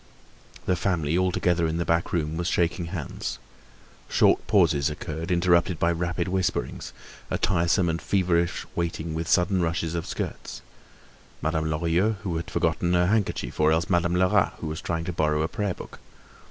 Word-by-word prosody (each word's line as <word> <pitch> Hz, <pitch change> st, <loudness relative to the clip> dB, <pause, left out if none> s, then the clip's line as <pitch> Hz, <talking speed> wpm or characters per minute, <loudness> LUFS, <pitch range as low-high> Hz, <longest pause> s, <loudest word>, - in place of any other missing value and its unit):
The 90 Hz, -, +2 dB
family, 80 Hz, -4 st, 0 dB
all 95 Hz, 0 st, +2 dB
together 85 Hz, -2 st, +1 dB
in 80 Hz, +1 st, -2 dB
the 85 Hz, -, -1 dB
back 85 Hz, 0 st, +1 dB
room, 80 Hz, -2 st, -1 dB
was 85 Hz, +1 st, -2 dB
shaking 85 Hz, 0 st, 0 dB
hands. 85 Hz, -6 st, -5 dB, 0.7 s
Short -, -, +3 dB
pauses 70 Hz, 0 st, +3 dB
occurred 80 Hz, +1 st, -5 dB
interrupted 85 Hz, 0 st, +3 dB
by 85 Hz, +2 st, +2 dB
rapid 85 Hz, +1 st, -2 dB
whisperings, 95 Hz, 0 st, -2 dB, 0.4 s
a -, -, 0 dB
tiresome 85 Hz, +2 st, +2 dB
and 80 Hz, 0 st, -1 dB
feverish 85 Hz, -3 st, +1 dB
waiting 85 Hz, -1 st, -2 dB
with 80 Hz, +1 st, -3 dB
sudden 90 Hz, +1 st, +3 dB
rushes 80 Hz, -1 st, -1 dB
of 85 Hz, -1 st, -3 dB
skirts—Madame 80 Hz, 0 st, -6 dB
Lorilleux 85 Hz, +7 st, +1 dB
who 90 Hz, -5 st, -2 dB
had 80 Hz, -, -5 dB
forgotten 90 Hz, 0 st, +1 dB
her 90 Hz, 0 st, +4 dB
handkerchief, 100 Hz, -, -1 dB
or 75 Hz, 0 st, +4 dB
else 80 Hz, +4 st, +1 dB
Madame 85 Hz, 0 st, +2 dB
Lerat 90 Hz, 0 st, +3 dB
who -, -, -7 dB
was 80 Hz, 0 st, -4 dB
trying 85 Hz, -1 st, -2 dB
to 90 Hz, -, -4 dB
borrow 75 Hz, -1 st, +1 dB
a -, -, 0 dB
prayer 100 Hz, -1 st, -2 dB
book. -, -, -11 dB
85 Hz, 165 wpm, -26 LUFS, 80-90 Hz, 0.7 s, her